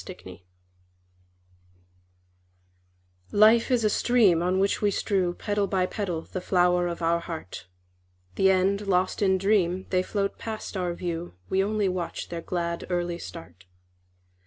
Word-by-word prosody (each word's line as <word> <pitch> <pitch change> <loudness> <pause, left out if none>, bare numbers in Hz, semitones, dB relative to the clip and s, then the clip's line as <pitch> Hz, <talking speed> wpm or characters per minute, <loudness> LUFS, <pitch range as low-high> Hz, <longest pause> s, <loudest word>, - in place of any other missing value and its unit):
Petals - - -11 2.9
Life 220 +4 +5
is 245 -3 +2
a 215 - +3
stream 210 -10 +3
On 180 +2 +1
which 195 +1 +1
we 205 - +3
strew 190 -3 0
Petal 205 -1 -1
by 185 -2 +1
petal 180 -4 -3
the 185 - -6
flower 180 -1 +2
of 170 -1 -5
our 170 +1 +2
heart; 160 - -8 0.7
The 190 - +3
end 195 +2 +1
lost 185 +1 +1
in 190 -2 +3
dream, 185 -2 +1
They 185 -1 +3
float 200 +1 -2
past 220 -2 -6
our 180 -2 -2
view, 170 - -5
We 190 0 +2
only 210 0 0
watch 180 -2 -4
their 170 -1 -5
glad, 170 -1 -3
early 175 -1 -2
start. 90 +1 -10
185 Hz, 140 wpm, -26 LUFS, 175-200 Hz, 2.9 s, Life